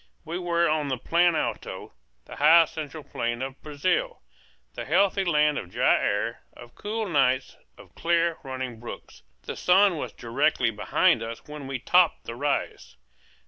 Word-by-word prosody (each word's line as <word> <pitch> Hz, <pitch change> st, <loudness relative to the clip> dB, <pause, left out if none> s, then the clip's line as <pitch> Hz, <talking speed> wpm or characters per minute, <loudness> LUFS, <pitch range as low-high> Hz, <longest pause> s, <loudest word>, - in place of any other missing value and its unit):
We 170 Hz, +3 st, -4 dB
were 170 Hz, -1 st, +1 dB
on 155 Hz, -1 st, 0 dB
the 130 Hz, -2 st, -2 dB
Plan 170 Hz, +6 st, +2 dB
Alto, -, -, -4 dB, 0.3 s
the -, -, -11 dB
high 165 Hz, +3 st, +7 dB
central 155 Hz, -1 st, -7 dB
plain 120 Hz, 0 st, -3 dB
of 135 Hz, 0 st, -7 dB
Brazil, 150 Hz, -, -2 dB, 0.5 s
the -, -, -6 dB
healthy 195 Hz, +5 st, +2 dB
land 150 Hz, -4 st, +2 dB
of 90 Hz, -, -9 dB
dry -, -, +3 dB
air, 105 Hz, +3 st, -1 dB
of 120 Hz, 0 st, -14 dB
cool 215 Hz, +1 st, -4 dB
nights, 130 Hz, -5 st, +1 dB, 0.2 s
of -, -, -16 dB
clear, 170 Hz, -1 st, 0 dB
running 130 Hz, -3 st, -6 dB
brooks. 120 Hz, -, -10 dB, 0.2 s
The -, -, -6 dB
sun 190 Hz, -1 st, +4 dB
was -, -, -5 dB
directly 120 Hz, 0 st, 0 dB
behind 105 Hz, +2 st, +2 dB
us 115 Hz, 0 st, -7 dB
when 150 Hz, -2 st, -8 dB
we 135 Hz, -1 st, -3 dB
topped 175 Hz, +6 st, +3 dB
the 115 Hz, -, -7 dB
rise. 140 Hz, -, -3 dB
150 Hz, 160 wpm, -26 LUFS, 125-170 Hz, 0.5 s, high